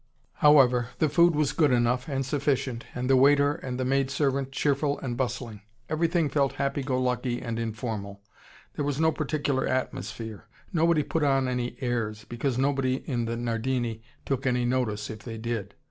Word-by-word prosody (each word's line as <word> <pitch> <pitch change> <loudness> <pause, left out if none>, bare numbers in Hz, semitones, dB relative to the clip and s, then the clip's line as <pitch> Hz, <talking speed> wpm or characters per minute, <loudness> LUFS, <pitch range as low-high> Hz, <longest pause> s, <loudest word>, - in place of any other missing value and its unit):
However, 130 -5 +5
the 155 - +2
food 170 +1 +4
was 150 -2 +1
good 150 -3 +3
enough, 125 +2 +2
and 135 -1 -1
sufficient, 135 -3 -1
and 125 0 -2
the 135 - +5
waiter 140 +2 +5
and 130 -5 -5
the 130 - 0
maid 135 +1 +1
servant 135 -1 0
cheerful 140 +1 +1
and 120 -3 -4
bustling. 120 -4 -3 0.3
Everything 165 0 +1
felt 140 -1 +1
happy 140 +1 -1
go 130 -1 -1
lucky 125 -1 -1
and 115 -2 -4
informal, 110 -3 -4 0.5
there - - -3
was 145 0 -1
no 160 0 +4
particular 145 -3 -1
atmosphere. 110 -3 -4 0.3
Nobody 165 -2 +3
put 160 +2 -1
on 135 -2 +2
any 125 -1 -2
airs, 110 -4 -2
because 120 +3 -2
nobody 135 -1 0
in 120 -5 -1
the 115 +1 -3
Nardini 120 0 -2 0.2
took 135 -1 -1
any 125 -1 +1
notice 115 -5 -1
if 110 - -8
they 115 +2 -7
did. 110 -3 -4
130 Hz, 175 wpm, -27 LUFS, 120-140 Hz, 0.5 s, However